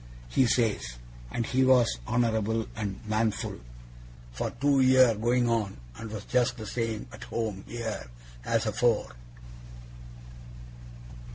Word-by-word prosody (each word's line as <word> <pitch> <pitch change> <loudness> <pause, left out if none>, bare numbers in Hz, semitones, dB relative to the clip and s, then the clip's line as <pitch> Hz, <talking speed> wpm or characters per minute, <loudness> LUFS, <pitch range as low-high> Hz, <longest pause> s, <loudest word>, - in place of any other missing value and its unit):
he 125 - +3
says. 110 - 0 0.3
And 115 - -2
he 130 +3 +2
was 125 - +4
honourable 110 -2 +1
and 100 -3 -4
manful 110 0 -1 0.7
for - - -3
two 140 +3 +2
year 130 -2 +6
going 120 +3 +1
on, 110 -4 0 0.2
and 115 - -7
we 110 - -6
was 105 - -7
just 125 0 +1
the 110 - -6
same 115 0 -2
at 110 - -9
home 110 -4 -3
here 115 - -4 0.4
as 115 - +1
afore. 115 +1 +1
115 Hz, 125 wpm, -28 LUFS, 110-120 Hz, 0.7 s, year